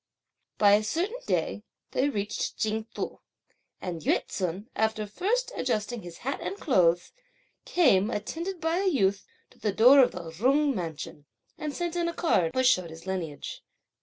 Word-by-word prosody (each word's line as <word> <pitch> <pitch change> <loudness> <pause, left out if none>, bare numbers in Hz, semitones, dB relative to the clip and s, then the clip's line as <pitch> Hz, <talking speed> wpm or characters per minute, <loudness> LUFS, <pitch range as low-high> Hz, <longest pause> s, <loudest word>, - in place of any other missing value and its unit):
By 205 -1 +6
a 210 +1 +4
certain 365 - -1
day, - - 0 0.3
they 275 +3 +1
reached 205 -6 -3
Ching 220 +1 -1
Tu; - - -4 0.6
and 175 -3 -5
Yü - - +1
ts'un, 185 +3 -3
after 220 -1 0
first 440 - -1
adjusting 235 -1 -1
his 175 -2 -10
hat 275 - -1
and 395 - -4
clothes, 175 - +3 0.5
came, 225 - +4
attended 335 - -4
by 325 +2 0
a 390 - +1
youth, 200 - +1 0.2
to - - -22
the 210 - 0
door 245 +7 +7
of 260 - +5
the 170 -2 -7
Jung 275 - +2
mansion, 160 - -6 0.3
and 300 -1 -5
sent 345 -1 -2
in 345 -1 0
a 340 - -3
card, 180 - +1
which 260 0 +2
showed 185 -9 +3
his 165 +1 -11
lineage. 175 -6 -4
220 Hz, 165 wpm, -28 LUFS, 185-305 Hz, 0.6 s, door